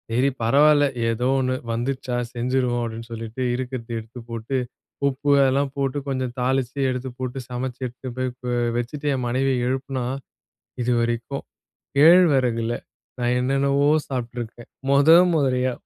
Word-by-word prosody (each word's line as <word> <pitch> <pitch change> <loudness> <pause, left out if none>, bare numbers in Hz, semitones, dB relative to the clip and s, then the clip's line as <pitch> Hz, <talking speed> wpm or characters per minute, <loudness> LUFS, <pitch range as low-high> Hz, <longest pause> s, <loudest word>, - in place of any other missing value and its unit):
சரி, 125 +4 +2
பரவால்ல. 145 +5 +5 0.2
ஏதோ 120 +2 0
ஒண்ணு 130 0 0 0.2
வந்துருச்சா, 125 +2 -2 0.2
செஞ்சிருவோம். 125 0 0
அப்டின்னு 115 +1 -7
சொல்லிட்டு 115 +2 -6
இருக்குறத 125 -2 -5
எடுத்துப் 115 +2 -11
போட்டு, 115 +3 -3 0.5
உப்பு 140 +1 0 0.2
எல்லாம் 135 +1 +1
போட்டு, 135 0 -1
கொஞ்சம் 130 -2 -2
தாளிச்சு, 130 +1 0
எடுத்துப் 125 -1 -4
போட்டு, 130 0 -4
சமச்சு, 125 0 -4
எடுத்து 125 +2 -8
போ 130 - -1 0.2
போய் 120 -1 0
வச்சுட்டு 140 +5 -3
என் 130 -2 -2
மனைவிய 130 0 +1
எழுப்புனா, 130 -1 -2 0.8
"இதுவரைக்கும் 120 +2 -1 0.5
கேழ்வரகுல 135 -8 +5 0.5
நான் 120 0 +1
என்னென்னவோ 140 +2 +2 0.2
சாப்ட்டுருக்கேன். 120 -2 -5 0.2
மொத 140 +3 +5 0.2
மொதரியா, 130 -4 +1
125 Hz, 125 wpm, -23 LUFS, 120-135 Hz, 0.8 s, பரவால்ல